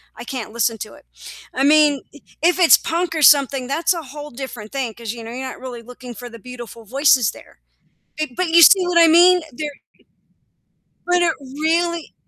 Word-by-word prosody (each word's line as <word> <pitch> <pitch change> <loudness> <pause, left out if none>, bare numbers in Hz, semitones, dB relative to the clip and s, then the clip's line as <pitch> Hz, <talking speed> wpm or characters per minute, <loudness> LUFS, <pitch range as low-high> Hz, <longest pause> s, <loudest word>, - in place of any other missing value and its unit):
I - - -10
can't 240 -4 -7
listen 230 -1 -1
to 215 - -8
it. - - -19 0.5
I 265 - -1
mean, 295 -1 +4 0.4
if 355 +2 +2
it's 345 - +7
punk 340 0 -3
or 315 - -2
something, 275 -3 +4
that's 325 +6 0
a 335 - -6
whole 295 +1 -10
different 235 -4 -9
thing 260 -5 -4
'cause, 230 -1 -7
you 235 -1 -10
know, 225 - -9
you're 260 +2 -6
not - - -9
really 245 -2 -8
looking 245 +1 -11
for 245 +2 -9
the 230 - -13
beautiful 240 -1 -11
voices 260 -1 +2
there, - - -18 0.6
eh, 310 - -1
but 365 -2 -1
you 335 +1 +5
see 370 +3 +6
what 355 -1 +1
I 335 - +7
mean? 350 +2 +5
They're 295 +4 -5 1.4
but 355 0 +2
it 335 -2 +2
really 320 +5 -2
280 Hz, 195 wpm, -19 LUFS, 245-330 Hz, 1.4 s, it's